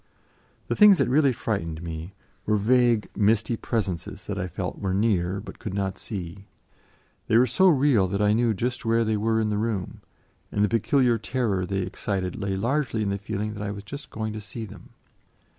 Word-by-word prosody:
The - - -1
things 210 -2 +8
that - - +2
really 140 +1 +4
frightened 100 -9 -3
me 85 +3 -6 0.3
were 105 - +3
vague, 120 +1 +3
misty 110 +2 +2
presences 95 -5 -3
that 100 -1 -4
I 90 - -2
felt 90 +1 -5
were 95 -2 -1
near, 100 -3 +1
but 95 -1 -10
could 105 -5 -5
not 95 -1 -2
see; 95 -1 -7 0.8
they 110 - +4
were 125 - +6
so 130 +11 +3
real 135 - +4
that 100 +2 -2
I 105 0 +3
knew 115 -1 +2
just 120 +5 -2
where 115 0 +2
they 110 0 +1
were 110 +2 +1
in 110 -1 0
the 105 - 0
room, 105 -4 -3 0.5
and 105 - +1
the - - -2
peculiar 120 +2 +2
terror 105 -5 -1
they 95 -1 -1
excited 95 0 -3
lay 95 -1 -2
largely 120 +1 0
in 100 - -1
the 100 - -2
feeling 105 +1 -3
that 105 - -7
I 105 - -3
was 100 0 -6
just 140 +7 -8
going 110 -1 -4
to 110 - -6
see 110 +3 -7
them. - - -13
105 Hz, 200 wpm, -25 LUFS, 95-115 Hz, 0.8 s, things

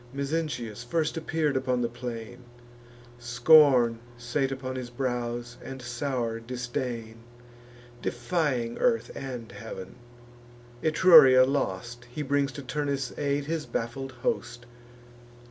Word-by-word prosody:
Mezentius 140 -6 -3
first 155 +5 -1
appear'd 160 -2 -1
upon 130 -1 0
the - - +1
plain: 120 0 -7 0.8
Scorn 120 -1 +5 0.2
sate 125 +3 -1
upon 130 -1 -4
his 125 -2 -5
brows, 120 -1 -3
and 135 0 -7
sour 120 -1 -2
disdain, 120 -1 -4 0.8
Defying 120 -2 -1
earth 235 -2 +1
and 125 -4 -6
heav'n. 95 -5 -8 0.9
Etruria 155 -6 +8
lost, 120 -3 -2
He 125 +5 -5
brings 140 0 +1
to 140 - -7
Turnus' 140 0 -2
aid 140 0 -1
his 160 0 -3
baffled 130 +3 -4
host. 120 0 -2
130 Hz, 110 wpm, -27 LUFS, 120-140 Hz, 0.9 s, Etruria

